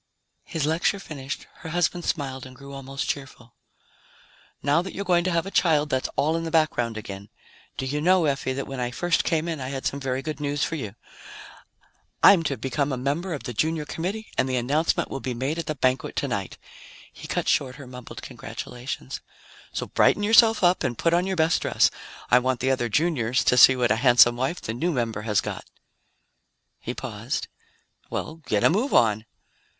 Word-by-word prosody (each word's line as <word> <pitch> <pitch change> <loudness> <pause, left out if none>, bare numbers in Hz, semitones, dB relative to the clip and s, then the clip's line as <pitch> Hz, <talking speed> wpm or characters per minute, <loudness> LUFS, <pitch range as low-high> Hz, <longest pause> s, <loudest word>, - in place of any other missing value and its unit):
His 160 -5 -2
lecture 160 +6 +1
finished, 145 -7 -6
her 160 - -8
husband 175 +1 0
smiled 135 -3 -3
and 130 - -13
grew 140 +2 -11
almost 135 0 -5
cheerful. 130 -4 -5 1.1
"Now 145 +4 +3
that 185 - -7
you're 200 - -4
going 175 -2 +3
to 185 - +1
have 170 0 +1
a 195 - -6
child, 150 -5 +2
that's 130 0 0
all 155 +3 +2
in 165 - -2
the 165 - -3
background 155 -8 +1
again. 100 -1 -8 0.5
Do 130 - -2
you 145 +3 -2
know, 180 +1 +4
Effie, 135 -2 0
that 135 +1 -3
when 135 -1 -6
I 120 -1 -1
first 175 +7 0
came 165 0 0
in, 160 -4 -3
I 130 - -4
had 135 -1 -5
some 135 +1 -1
very 135 -1 -2
good 155 -1 -4
news 145 0 -1
for - - -1
you? 110 -10 -5 1.3
I'm 190 -4 +8
to 135 - -1
become 140 +2 -1
a 130 - -1
member 150 +7 -2
of 145 - -8
the 120 - -5
Junior 155 +5 0
Committee 195 +9 -4
and 130 - +2
the 130 - 0
announcement 140 +7 0
will 135 - -3
be 130 -2 -4
made 135 +7 -2
at 165 - -4
the 155 - -2
banquet 130 -1 0
tonight." - - -2 0.6
He - - -10
cut - - -2
short 130 -3 +1
her 140 - -10
mumbled 125 -1 -10
congratulations. 120 - -6 0.5
"So - - -3
brighten 205 - +3
yourself 225 0 +5
up 175 -1 +4
and 120 -5 -1
put 165 - +1
on 175 +2 +2
your 190 - -1
best 160 +1 +3
dress. - - +3 0.4
I 125 - +7
want 130 0 0
the 130 +1 +1
other 120 -3 0
Juniors 130 -3 +1
to - - +3
see 130 +1 +8
what 120 -3 +1
a 110 - +3
handsome 120 -1 +6
wife 130 +8 -2
the 110 - -4
new 165 +9 -1
member 115 -6 -2
has 105 -1 +3
got." - - -6 1.1
He - - -5
paused. - - -4 0.6
"Well, 155 - -4
get 105 -1 +1
a - - +6
move 230 +10 +1
on!" 110 -1 +3
140 Hz, 200 wpm, -25 LUFS, 125-165 Hz, 1.3 s, I'm